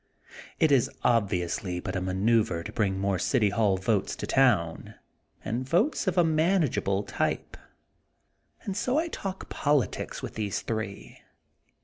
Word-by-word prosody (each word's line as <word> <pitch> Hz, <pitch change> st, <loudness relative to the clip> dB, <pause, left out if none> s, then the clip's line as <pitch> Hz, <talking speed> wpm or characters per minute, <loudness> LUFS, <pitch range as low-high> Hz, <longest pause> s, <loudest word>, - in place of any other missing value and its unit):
It 160 Hz, -2 st, +3 dB
is 135 Hz, -4 st, +4 dB
obviously 95 Hz, -5 st, 0 dB
but -, -, -5 dB
a 90 Hz, -, -1 dB
ma 95 Hz, 0 st, -2 dB
neuver 105 Hz, -3 st, +2 dB
to -, -, -6 dB
bring 100 Hz, -4 st, 0 dB
more 95 Hz, -1 st, 0 dB
City 115 Hz, -7 st, +2 dB
Hall 100 Hz, -2 st, +2 dB
votes 100 Hz, +1 st, 0 dB
to -, -, -5 dB
town 120 Hz, -12 st, +1 dB, 0.5 s
and 125 Hz, +4 st, -3 dB
votes 210 Hz, -, +1 dB
of 185 Hz, -, 0 dB
a 175 Hz, -, +6 dB
manageable 155 Hz, -, +1 dB
type. -, -, -2 dB, 1.1 s
And 195 Hz, -, -4 dB
so 250 Hz, +6 st, 0 dB
I 335 Hz, +2 st, 0 dB
talk 195 Hz, -, -5 dB
politics 145 Hz, -8 st, -1 dB
with -, -, -5 dB
these 105 Hz, -3 st, -3 dB
three. 110 Hz, -3 st, -5 dB
115 Hz, 145 wpm, -27 LUFS, 95-155 Hz, 1.1 s, a